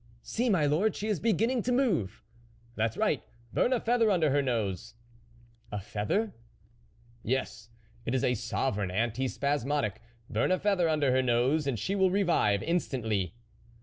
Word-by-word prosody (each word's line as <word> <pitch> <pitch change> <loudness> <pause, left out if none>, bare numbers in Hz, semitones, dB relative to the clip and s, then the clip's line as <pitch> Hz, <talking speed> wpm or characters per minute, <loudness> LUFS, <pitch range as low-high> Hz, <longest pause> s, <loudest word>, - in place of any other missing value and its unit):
" - - -32
See, 240 +2 +1
my 175 -8 +3
lord, 170 +9 +2
she 215 - -3
is 205 -6 0
beginning 230 +2 +1
to 250 - -1
move." 195 - 0 0.2
" 115 0 -30
That's 110 0 -1
right! 180 - +1 0.3
burn 245 - +2
a 255 - +2
feather 230 -1 +2
under 165 -7 +3
her 145 +1 +3
nose." 110 -7 -2 0.4
" 115 -1 -29
A 105 - -3
feather? 110 - -2 0.3
" 115 +1 -33
" 115 0 -29
Yes, 120 -3 -2 0.3
it 120 - -1
is 130 - 0
a 125 - +3
sovereign 110 -3 -1
anti 115 +7 0
spasmodic; 140 -5 -1 0.3
burn - - 0
a 185 - +3
feather 185 -4 +1
under 150 -4 +2
her 130 +1 +3
nose, 130 +5 +2
and 130 -4 0
she 110 - -2
will 190 -2 +3
revive 175 - +2
instantly." 110 - -1
135 Hz, 180 wpm, -29 LUFS, 115-190 Hz, 0.4 s, my